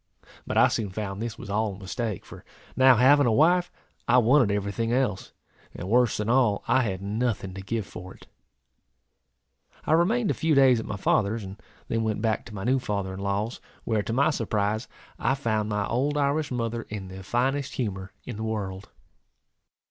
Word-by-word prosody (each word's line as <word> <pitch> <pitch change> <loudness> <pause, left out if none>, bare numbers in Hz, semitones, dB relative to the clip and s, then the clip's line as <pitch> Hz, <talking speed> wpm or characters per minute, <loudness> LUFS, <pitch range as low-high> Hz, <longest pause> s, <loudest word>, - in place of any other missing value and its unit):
But - - -2
I - - +7
soon 105 -3 -2
found 100 +1 -5
this 115 -2 -4
was 100 - -8
all 105 -1 0
a - - -12
mistake 105 +1 -4
for - - -12 0.3
now 130 -1 +6
having 135 +4 +5
a - - +3
wife, 175 +8 +3 0.4
I 120 - +5
wanted 125 0 +5
every 100 0 -1
thing 115 +2 -2
else; 120 -6 0 0.4
and, 90 - -6
worse 120 +1 +3
than 105 - -2
all, 120 -4 +2
I 130 - +4
had 95 -5 -3
nothing 105 -2 -2
to 95 - -7
give 110 +2 -3
for 90 0 -10
it. - - -17 1.6
I - - -1
remained 200 +7 +3
a - - +1
few 160 -2 +1
days 130 -3 +5
at 110 - -6
my 105 - -4
father's, 105 +3 +1
and 95 +2 -9 0.3
then 115 - -1
went 110 -2 -1
back 110 0 -1
to 110 - -10
my 95 - -5
new 130 +3 +2
father 100 -5 -3
in 95 - -7
law's; 100 +4 -2 0.2
where, 110 -2 0
to 105 - -5
my 140 +6 +3
surprise, 110 -3 -1 0.3
I 135 - +1
found 110 -5 -1
my 105 -1 0
old 140 +7 0
Irish 145 +2 +1
mother 115 -2 -2
in 100 -3 -6
the 95 +1 -9
finest 130 +7 -1
humour 95 -5 -3
in 120 - -6
the 110 - -4
world. 100 -4 -4
110 Hz, 195 wpm, -26 LUFS, 100-130 Hz, 1.6 s, I